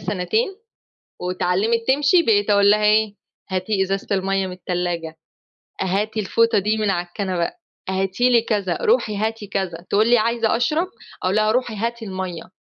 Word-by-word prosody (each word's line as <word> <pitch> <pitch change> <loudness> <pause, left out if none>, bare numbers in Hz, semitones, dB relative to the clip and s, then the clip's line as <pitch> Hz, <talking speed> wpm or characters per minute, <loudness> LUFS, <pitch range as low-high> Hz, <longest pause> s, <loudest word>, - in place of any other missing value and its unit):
سنتين، 210 - -1 0.6
واتعلمِت 185 +5 0
تمشي 290 +6 +4
بقيت 210 -6 +2
اقول 200 0 +5
لها 210 0 +3
إيه؟: 215 0 +3 0.4
"هاتي 190 +2 0
إزازة 195 +1 -2
المَيَّة 195 0 0
من 185 - -6
التلاجة، 175 -3 -3 0.7
هاتي 205 +4 -1
الفوطة 230 +2 +2
دي 210 +3 0
من 215 -1 0
على 175 -2 -1
الكنبة، 180 -2 -2 0.4
هاتي 195 +6 +1
لي 240 -2 +5
كذا، 205 -5 -1
روحي 445 - +2
هاتي 220 0 -2
كذا،" 180 -3 -3
تقول 215 +2 +3
لي: 240 - +6
"عايزة 230 0 +1
أشرب." 305 +9 +1 0.4
أقول 185 +2 +1
لها: 215 0 +3
"روحي 245 -2 -1
هاتي 230 +2 -3
المَيَّة" 185 -3 -6
205 Hz, 155 wpm, -21 LUFS, 185-225 Hz, 0.7 s, لي